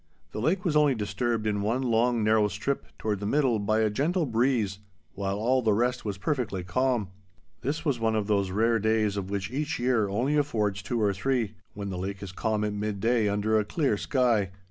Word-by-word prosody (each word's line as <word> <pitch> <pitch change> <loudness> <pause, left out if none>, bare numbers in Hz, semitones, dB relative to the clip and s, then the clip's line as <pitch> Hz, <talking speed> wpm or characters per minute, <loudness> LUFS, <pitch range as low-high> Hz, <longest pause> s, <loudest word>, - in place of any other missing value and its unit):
The - - -5
lake 180 - +1
was 160 -4 +1
only 150 -3 +4
disturbed 110 +2 -1
in 105 -1 0
one 115 +6 0
long 120 -1 +2
narrow 110 0 +4
strip 105 +7 -3
toward 105 -3 -2
the 100 - -3
middle 130 -3 +2
by 110 +2 +1
a 110 - +3
gentle 160 - +1
breeze 115 -5 +1 0.3
while 100 0 -2
all 125 +5 +2
the 110 -3 +2
rest 125 +3 0
was 100 -2 -3
perfectly 110 - -2
calm. 115 +2 0 0.5
This 145 +6 -3
was 140 -6 +1
one 110 -1 +1
of 105 -2 0
those 100 -2 +1
rare 115 +4 +2
days 110 -1 +1
of 95 -2 -4
which 100 +1 -3
each 150 +3 -2
year 120 -4 +1
only 125 +9 0
affords 105 -9 0
two 115 +4 -2
or 105 -2 +2
three, 115 +1 -1 0.2
when 100 -1 -4
the 90 - -4
lake 95 +1 -4
is 95 - -6
calm 110 +2 -1
at 105 -1 -1
midday 105 +2 0
under 105 +2 +1
a - - +1
clear 135 +1 0
sky. 115 -4 +1
110 Hz, 210 wpm, -27 LUFS, 100-125 Hz, 0.5 s, only